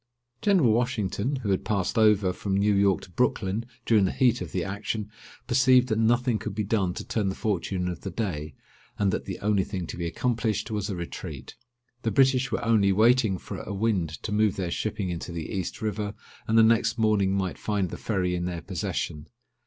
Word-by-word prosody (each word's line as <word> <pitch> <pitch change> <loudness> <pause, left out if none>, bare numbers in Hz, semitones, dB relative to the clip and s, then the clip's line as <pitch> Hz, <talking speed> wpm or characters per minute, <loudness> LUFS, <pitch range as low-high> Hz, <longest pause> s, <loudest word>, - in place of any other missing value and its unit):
General 180 - +4
Washington, 120 +1 0
who 100 - 0
had 95 - 0
passed 100 -4 -1
over 105 -4 +4
from 95 +1 -2
New 105 +1 +3
York 100 -1 +3
to 90 - -13
Brooklyn 105 0 0 0.2
during 105 -4 +4
the 95 - 0
heat 125 -2 +2
of - - -5
the 90 - -1
action, 105 +2 -4 0.3
perceived 130 0 +4
that 110 0 +1
nothing 120 0 +2
could 105 -1 -5
be 105 - -1
done 95 -3 0
to - - -6
turn 105 -4 0
the 95 - -3
fortune 95 -4 -1
of 90 - -4
the 95 - -4
day, 85 - -4 0.4
and 100 -2 +2
that - - -3
the - - -5
only 105 -2 +2
thing 90 -2 -4
to - - -7
be 85 -1 -2
accomplished 110 +1 -1
was 105 -2 -2
a 100 - -2
retreat. 85 -1 -7 0.5
The 115 - 0
British 135 0 +3
were 115 - -2
only 105 -4 +4
waiting 110 0 +4
for - - -7
a 100 - -5
wind 100 -5 +1
to 105 - -4
move 105 -1 +2
their 90 -3 -3
shipping 105 -3 -2
into 85 +1 -5
the 85 -2 -5
East 95 +2 -4
River, 105 -1 -2 0.3
and 110 - +2
the 115 - +8
next 115 +1 +3
morning 105 -4 +2
might 95 -7 -2
find 100 -4 -1
the - - -5
ferry 90 -5 -1
in 90 0 -2
their 85 -2 -4
possession. 75 +1 -3
105 Hz, 210 wpm, -26 LUFS, 95-115 Hz, 0.5 s, the